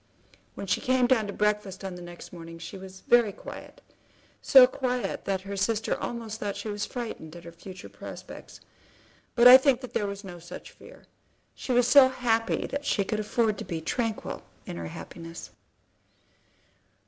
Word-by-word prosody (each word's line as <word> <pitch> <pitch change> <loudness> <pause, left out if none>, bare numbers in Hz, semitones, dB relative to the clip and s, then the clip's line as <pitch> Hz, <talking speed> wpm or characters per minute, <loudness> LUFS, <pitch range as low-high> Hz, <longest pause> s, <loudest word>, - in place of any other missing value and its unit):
When - - -6
she 185 - 0
came 255 0 +3
down 240 -4 +2
to - - -4
breakfast 210 -2 -1
on 190 -1 -4
the 180 - -9
next 175 0 -10
morning 165 -1 -9
she 165 +4 -8
was 190 0 -10
very 240 -3 +4
quiet, - - -11 0.6
so 265 -2 +9
quiet 250 -1 -2
that 190 -1 -1
her 200 +1 -6
sister 215 +3 0
almost 225 -2 -5
thought 205 -1 -3
she 205 +2 -5
was 205 0 -3
frightened 225 - -6
at 170 - -11
her 170 - -9
future 185 +2 -11
prospects; - - -10 0.7
but 240 0 +7
I 250 +1 +12
think 265 -2 +3
that 255 - -9
there 205 - 0
was 200 +1 -6
no 175 -3 -9
such 170 - -10
fear. - - -16 0.5
She - - -5
was 245 -1 +4
so 270 -1 +8
happy 230 -3 0
that 285 - -4
she 210 -7 +1
could 215 +2 -2
afford 215 -1 0
to - - -4
be 165 - -4
tranquil 225 +7 -3 0.2
in - - -6
her 85 -1 -5
happiness. 165 - -9
210 Hz, 180 wpm, -27 LUFS, 185-240 Hz, 0.7 s, I